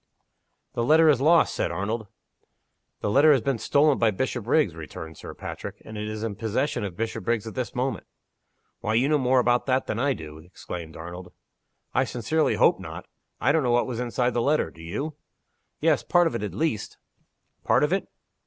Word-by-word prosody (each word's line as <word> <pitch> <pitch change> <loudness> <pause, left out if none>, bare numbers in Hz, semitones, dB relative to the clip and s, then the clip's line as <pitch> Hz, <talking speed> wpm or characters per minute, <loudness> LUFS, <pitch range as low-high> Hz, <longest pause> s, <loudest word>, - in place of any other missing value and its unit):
"The 120 - -1
letter 155 +5 +6
is 135 -4 +3
lost," 165 +3 +5
said - - -1
Arnold. 110 +2 -3 0.9
"The - - -1
letter 145 +6 +6
has 135 - +2
been 130 0 -1
stolen 145 +3 +3
by 115 - +4
Bishopriggs," 120 - 0
returned 80 0 -8
Sir - - -9
Patrick, - - -7
"and 110 - -9
is 105 +1 -4
in 115 - -1
the 100 - -11
possession 110 +4 -1
of 95 -4 -5
Bishopriggs 115 0 -1
at 110 - -6
this 125 -2 -4
moment." 130 +2 -2 0.7
"Why, 110 +1 -1
you 125 +4 +3
know 150 0 +3
more 130 0 +3
about 120 +2 +2
it 130 +1 +2
than 110 - -3
I 140 +2 +2
do!" 80 -6 -9
exclaimed 85 -1 -8
Arnold. 90 +2 -8 0.6
"I - - +3
sincerely 140 +7 0
hope - - +4
not. - - -8 0.3
I 140 - +3
don't 160 +1 +3
know 125 - 0
what 120 0 +3
was 120 -2 -4
inside 125 0 0
the 120 - +1
letter. 145 +5 +1
Do 80 - -15
you?" 140 - -4 0.6
"Yes. 155 -2 +3
Part 175 -1 +3
of 165 - 0
it - - -3
at 100 -4 -4
least." 115 -5 -2 0.7
"Part - - +3
of 150 +4 +2
it?" 195 - -1
120 Hz, 195 wpm, -26 LUFS, 105-140 Hz, 0.9 s, letter